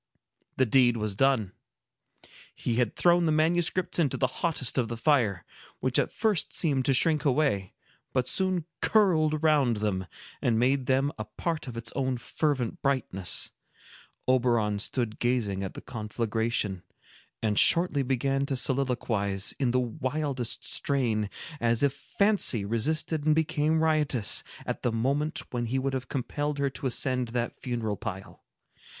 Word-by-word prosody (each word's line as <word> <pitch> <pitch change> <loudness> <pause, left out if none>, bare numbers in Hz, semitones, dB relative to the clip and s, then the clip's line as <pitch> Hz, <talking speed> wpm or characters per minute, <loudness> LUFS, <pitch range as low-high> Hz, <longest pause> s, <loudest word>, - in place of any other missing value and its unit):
The 130 - +4
deed 120 0 +4
was 105 -2 -2
done. 115 -3 +2 1.0
He 120 -2 -2
had 120 -4 +1
thrown 175 -1 +4
the - - +2
manuscripts 170 +4 +1
into 150 -6 +1
the 130 - +2 0.2
hottest 145 -7 0
of 120 - 0
the 115 +1 -5
fire, 115 - +1 0.3
which 130 -1 +1
at - - 0
first 210 -6 0
seemed 140 -6 +1
to 135 - +4
shrink 155 +2 +3
away, 125 - +1 0.4
but 130 -1 0
soon 185 -4 0 0.2
curled 165 -8 +3
around 150 -7 +2
them, 95 -3 -2 0.3
and 115 -2 +2
made 130 +2 +1
them 135 +2 +2
a 110 - -3
part 155 +9 -4
of 120 -2 -7
its 115 0 -2
own 130 -2 0
fervent 130 0 -2
brightness. 120 -10 0 0.8
Oberon 120 -5 +2
stood 110 0 -2
gazing 110 -6 0
at 95 - -6
the - - -7
conflagration, 110 -3 -2 0.6
and 105 -2 +2
shortly 170 -4 +4
began 135 +1 0
to 135 - -1
soliloquize, 120 -7 0
in 130 -3 +1
the 130 +1 +2
wildest 130 0 -2
strain, 120 -7 0 0.3
as 115 +2 +1
if 140 -1 +3
Fancy 200 - +1
resisted 150 +8 0
and 155 0 +3
became 160 0 +1
riotous, 150 - +2 0.2
at - - -4
the 120 - 0
moment 140 +7 -1
when 120 -2 -2
he 130 +4 -1
would 135 +1 -1
have 125 -1 -4
compelled 145 +3 -2
her 140 -1 0
to 135 0 -4
ascend 125 0 0
that 120 0 -3
funeral 115 -5 -2
pile. 100 -4 -7
130 Hz, 150 wpm, -28 LUFS, 115-150 Hz, 1.0 s, The